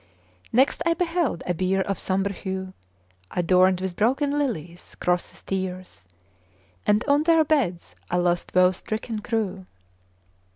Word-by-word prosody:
Next 260 +6 +3
I 335 0 +2
beheld 335 - 0
a 180 - 0
bier 185 +3 +1
of 195 0 -2
sombre 195 +1 0
hue 190 -1 -5 0.6
Adorned 185 +1 +3
with 190 -2 -3
broken 270 +7 +1
lilies; 175 - -3
crosses, 180 0 -2
tears; 185 - -5 0.8
And 210 +2 +3
on 285 0 +3
their 325 0 +4
beds 260 - 0
a 175 - +1
lost 175 0 0
woe 185 0 +6
stricken 215 +4 -4
crew. 205 -4 -3
190 Hz, 130 wpm, -25 LUFS, 180-260 Hz, 0.8 s, woe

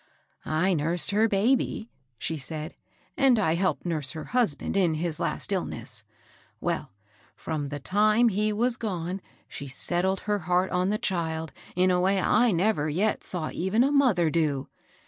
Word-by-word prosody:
"I 180 +5 +2
nursed 165 +2 +1
her 215 +2 +3
baby," 225 +2 0 0.3
she 160 - -3
said, 155 +2 -5 0.4
"and 270 -4 +4
I 180 -7 +2
helped 185 +2 0
nurse 155 -6 -1
her 155 - -6
husband 230 - +1
in 180 -5 +3
his 160 0 -2
last - - -2
illness. - - -4 0.6
Well, - - -2 0.4
fi*om 150 -3 -4
the 145 0 -5
time 215 - +3
he 210 +1 0
was 235 +3 +1
gone, 185 -4 -3 0.3
she 140 - -7
set 175 +7 0
tled 190 0 0
her 210 -1 -1
heart 180 +1 +2
on 180 +1 +1
the 210 - +1
child 160 -5 -2 0.2
in 185 +1 +3
a 180 0 +2
way 190 +1 +2
I 220 +6 +3
never 175 -4 +1
yet 195 +8 0
saw 170 -4 -2
even 190 +7 +1
a 275 - +2
mother 225 - +3
do. 145 -5 0
180 Hz, 165 wpm, -27 LUFS, 160-210 Hz, 0.6 s, and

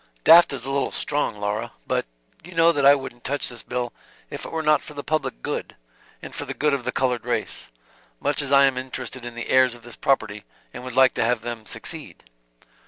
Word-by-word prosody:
"Daft 170 +3 +8
is 130 -3 -4
a 135 - -2
little 140 0 0
strong, 145 -7 -2
Laura. 105 +3 -2
But - - -1 0.4
you 175 +1 -12
know 165 +1 +6
that 140 -4 +3
I 140 - +9
wouldn't 135 -3 -8
touch 145 +2 -1
this 120 -1 -8
bill 125 -1 -3 0.4
if - - -6
it - - -7
were 160 -1 -2
not 150 -1 +4
for 150 - -11
the 145 - -5
public 155 - -2
good, - - -4 0.5
and - - -8
for - - -4
the - - -5
good 150 -1 +1
of 135 -3 -2
the - - 0
colored 125 -2 0
race; - - -3 0.5
much - - 0
as 140 -1 -4
I 140 0 +7
am 130 -2 +1
interested 130 -1 -5
in 120 -1 -7
the 120 - -6
heirs 130 -2 +5
of 120 - -16
this 120 -1 -10
property, 105 -6 0 0.3
and - - -8
would 125 -1 -7
like 130 -1 +6
to - - 0
have 120 0 +1
them 115 -2 -6
succeed." 115 - -5
130 Hz, 230 wpm, -24 LUFS, 120-145 Hz, 0.5 s, I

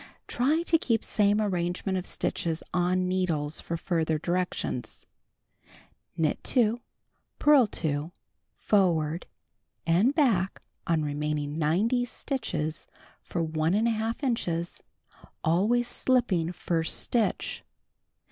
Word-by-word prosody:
(Try 295 +7 +1
to 330 -1 +3
keep 230 -6 0
same 205 0 +2
arrangement 185 -1 -1
of 185 -1 -2
stitches 165 -1 -2
on 180 +1 +1
needles 165 -5 0
for 170 - -4
further 160 -2 0
directions.) 175 -6 -3 1.1
Knit 155 -2 0
2, 240 -2 +2 0.6
purl 290 -6 +5
2 155 -3 0 0.5
forward 170 -5 +1 0.6
and 190 - +3
back 220 - +1 0.2
on 165 -3 +2
remaining 150 +1 -2
90 210 +11 +2
stitches 170 - -3 0.3
for 170 - -3
Ih 210 +9 +1
inches, 175 -9 -2 0.6
always 210 +9 +2
slipping 240 -10 +1
first 165 -2 0
stitch. 235 -3 -1
180 Hz, 100 wpm, -27 LUFS, 160-225 Hz, 1.1 s, purl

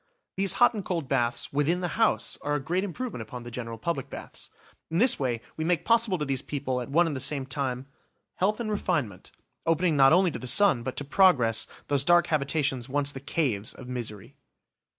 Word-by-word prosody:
These 195 0 +2
hot 245 - +4
and 210 -3 -4
cold 170 -6 -3
baths 120 +1 -1
within 150 +5 +1
the 175 - -2
house 225 +4 +1
are 145 0 -1
a - - 0
great 175 +7 -1
improvement 205 - -5
upon 120 +2 -8
the 120 - -9
general 115 -1 -6
public 140 +1 -3
baths. - - -8 0.4
In 165 - -2
this 240 +6 +5
way 120 -4 -1 0.2
we 160 - -2
make 165 -1 0
possible 230 -4 +3
to 150 - -2
these 135 -2 -1
people, 130 -3 -3
at 125 - -7
one 170 +5 +4
and 160 -3 -2
the - - -3
same 135 0 -2
time, 130 -2 -3 0.5
health 210 +4 +1
and 220 -2 -3
refinement, 145 - -2 0.3
opening 165 0 +1
not 135 -1 +6
only 180 +1 +4
to - - -6
the 130 - -7
sun, 175 -1 +5
but 130 +2 -5
to - - -4
progress, 140 - +3 0.2
those 140 -2 +1
dark 175 +2 +5
habitations 140 -4 -1
once 145 +1 0
the 135 - -8
vile 140 - -26
caves 115 -11 -1
of 130 - -11
misery. 120 0 -6
145 Hz, 210 wpm, -27 LUFS, 130-175 Hz, 0.5 s, not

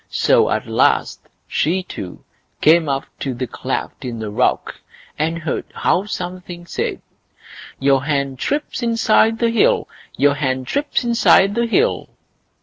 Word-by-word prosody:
So - - +3
at - - -1
last - - +1 0.3
she 180 +5 0
too 95 - -8 0.4
came 160 -1 +4
up 135 0 -1
to 135 -3 -3
the 130 +2 -3
cleft - - -5
in 120 -2 -5
the 110 -2 -5
rock, - - 0 0.4
and 160 +2 0
heard 160 -4 -3
how 190 - +1
something 180 -2 -6
said: - - -3 0.8
Your 135 0 +2
hen 140 -3 -1
trips 290 - -3
inside 225 -1 +3
the 230 0 +1
hill! 230 - +2 0.3
Your 140 +2 +4
hen 130 -2 -2
trips 285 - -1
inside 230 -4 +4
the 235 +2 0
hill! 430 - +1
170 Hz, 145 wpm, -19 LUFS, 135-225 Hz, 0.8 s, came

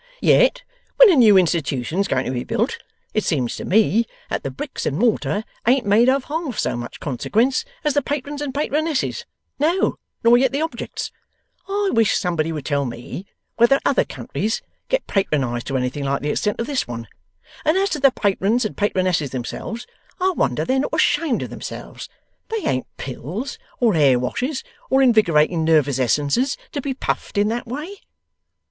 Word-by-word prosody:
Yet - - +4 0.3
when - - +9
a - - +4
new 220 -7 +7
Institution's 165 0 +1
going 130 - 0
to - - -2
be 125 -1 -2
built, 255 - -1 0.3
it 215 - +1
seems 130 -8 0
to - - -6
me 220 +2 +3 0.2
that - - -1
the 135 - -4
bricks 130 - -5
and 140 - -1
mortar 220 -1 +1 0.2
ain't 255 0 +4
made 220 +5 +5
of 270 0 +2
half 300 -5 -4
so - - 0
much 120 0 -7
consequence 225 - 0 0.2
as 300 -2 +1
the 290 - +2
Patrons 290 +1 -4
and 290 -2 -2
Patronesses; 300 +1 -1 0.3
no, 335 +6 +1 0.2
nor 235 +1 +6
yet 265 0 +3
the 280 - 0
objects. 325 - -5 0.6
I 400 0 0
wish 225 -2 +3
somebody 165 -3 -1
would 150 -4 -5
tell 140 -2 +1
me 125 +10 -7 0.3
whether 240 +4 +5
other - - +3
countries 220 +2 -3 0.3
get - - +1
Patronized 135 - -1
to 135 - 0
anything 130 +3 -2
like 140 +1 -1
the 150 - 0
extent 210 +6 -1
of 230 - -1
this 275 0 -1
one! 115 -1 -6 0.6
And 310 +4 +3
as 395 +1 +2
to 300 - -1
the 275 0 +6
Patrons 215 0 +1
and 215 - -3
Patronesses 185 -7 +1
themselves, 135 - -5 0.3
I 375 +1 +2
wonder - - 0
they're 260 +1 +1
not 285 - -1
ashamed 305 -3 +2
of - - -7
themselves. - - -8 0.4
They 445 -2 -3
ain't 130 0 0
Pills, 165 - -5 0.2
or 235 -4 +3
Hair 140 -6 +4
Washes, 255 - -2 0.3
or 265 +1 +4
Invigorating 170 -9 +4
Nervous 150 -4 +3
Essences, 145 - +1
to 285 - -3
be 270 -1 -3
puffed 255 - -3
in 205 +1 +3
that 240 +2 -3
way! 305 - -6
220 Hz, 180 wpm, -21 LUFS, -, 0.6 s, when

